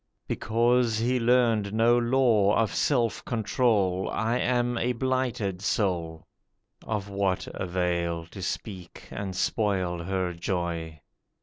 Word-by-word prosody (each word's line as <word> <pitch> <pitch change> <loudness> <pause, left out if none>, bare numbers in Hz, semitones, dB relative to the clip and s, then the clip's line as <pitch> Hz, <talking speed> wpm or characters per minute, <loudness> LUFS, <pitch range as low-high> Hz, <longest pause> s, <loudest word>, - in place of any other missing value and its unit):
Because 115 +1 +1
he 125 +3 +1
learned 115 -4 +2
no 115 +2 +4
law 120 -4 +3
of 115 -3 +1
self 120 -6 +1
control, 105 -5 +1
I 115 +2 0
am 120 -1 +1
a 125 +1 0
blighted 120 -7 -1
soul.' 85 -6 -1 0.6
Of 105 -3 -2
what 100 -2 -1
avail 85 -2 -1
to 95 - -8
speak 95 -1 -6
and 95 -2 -5
spoil 95 -4 0
her 95 -1 -1
joy. 85 -3 -3
105 Hz, 115 wpm, -27 LUFS, 90-120 Hz, 0.6 s, no